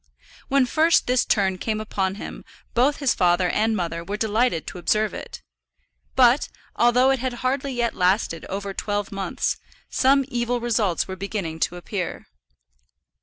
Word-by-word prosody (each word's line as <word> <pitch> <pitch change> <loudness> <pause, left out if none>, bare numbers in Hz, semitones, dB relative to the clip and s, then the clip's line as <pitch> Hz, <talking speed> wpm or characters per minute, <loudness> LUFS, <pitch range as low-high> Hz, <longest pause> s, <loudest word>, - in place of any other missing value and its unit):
When 275 -1 +3
first 320 +6 +3
this 250 0 +2
turn 190 -3 +1
came 215 +1 -2
upon 195 -3 -2
him 210 - -8 0.3
both 265 +5 +3
his 275 -4 +2
father 180 0 +2
and 220 +1 +1
mother 170 -2 -3
were 200 +4 -4
delighted 220 -4 +1
to 180 - -7
observe 215 +3 +1
it; - - -8 0.7
but, - - +5 0.3
although 250 +2 +4
it 270 - +1
had 255 0 -2
hardly 270 +1 0
yet 240 -1 0
lasted 180 -3 +1
over 195 +1 -4
twelve 205 +1 -2
months, 195 -1 -2 0.3
some 275 +1 +3
evil 245 -1 -1
results 220 -7 0
were 190 - -5
beginning 190 -5 -4
to 175 - -11
appear. 180 +1 -5
215 Hz, 155 wpm, -23 LUFS, 190-245 Hz, 0.7 s, but